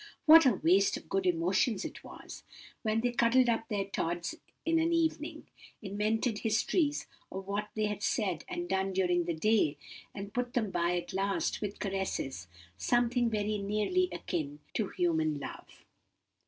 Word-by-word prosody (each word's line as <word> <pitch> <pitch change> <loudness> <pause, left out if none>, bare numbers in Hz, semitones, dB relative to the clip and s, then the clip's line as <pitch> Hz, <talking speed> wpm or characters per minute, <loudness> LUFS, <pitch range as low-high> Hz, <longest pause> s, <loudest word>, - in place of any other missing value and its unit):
What 320 -1 +9
a 245 - +4
waste 190 +3 +3
of - - -12
good 195 -1 0
emotions 185 +5 +1
it - - -7
was, - - -10 0.4
when 220 0 +1
they 245 +1 +1
cuddled 240 +1 +4
up 225 -1 0
their 200 -2 -1
Tods 175 -2 -2 0.3
in 330 0 +3
an 330 +1 +2
evening; 320 -2 -1 0.3
invented 215 +3 -1
histories 290 +7 +1 0.3
of 190 0 -6
what 205 +1 -3
they 215 -1 +1
had 210 -1 -3
said 190 -8 0
and 175 0 -4
done 190 +1 0
during 180 -2 +2
the 170 -1 -1
day, 160 -5 +2 0.4
and 200 0 -7
put 245 0 -2
them 220 -5 0
by 175 0 +1
at 175 0 -5
last 195 +1 -1
with 205 -1 -4
caresses 190 - -3 0.3
something 240 - +2
very 210 -1 -1
nearly 215 - +1
akin 150 -4 -3 0.2
to 215 - 0
human 160 -4 0
love!" - - -10
205 Hz, 160 wpm, -31 LUFS, 180-230 Hz, 0.4 s, What